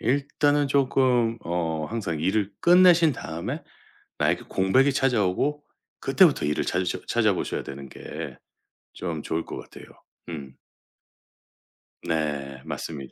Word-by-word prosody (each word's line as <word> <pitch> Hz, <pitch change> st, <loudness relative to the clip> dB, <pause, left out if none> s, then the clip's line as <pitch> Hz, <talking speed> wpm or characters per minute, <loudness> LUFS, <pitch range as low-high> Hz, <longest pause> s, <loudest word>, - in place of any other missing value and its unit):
일단은 145 Hz, +3 st, +1 dB
쪼끔 130 Hz, -4 st, +2 dB
어 80 Hz, -2 st, -2 dB
항상 100 Hz, -9 st, -3 dB
일을 100 Hz, +4 st, 0 dB
끝내신 175 Hz, -3 st, +6 dB
다음에 85 Hz, -6 st, -5 dB, 0.6 s
나에게 -, -, +1 dB
공백이 130 Hz, +9 st, +3 dB
찾아오고 135 Hz, +2 st, +1 dB, 0.4 s
그 135 Hz, -, -4 dB
때부터 165 Hz, -, +5 dB
일을 75 Hz, -, 0 dB
찾으셔 90 Hz, -1 st, -1 dB
찾아보셔야 -, -, 0 dB
되는 70 Hz, 0 st, -8 dB
게 -, -, -8 dB, 0.6 s
좀 80 Hz, -4 st, -4 dB
좋을 80 Hz, +1 st, -2 dB
것 -, -, -7 dB
같아요. -, -, -12 dB, 0.4 s
음. 70 Hz, -6 st, -8 dB, 1.4 s
네 75 Hz, -5 st, -2 dB
맞습니다. 70 Hz, -5 st, -6 dB
100 Hz, 255 characters per minute, -25 LUFS, -, 1.4 s, 끝내신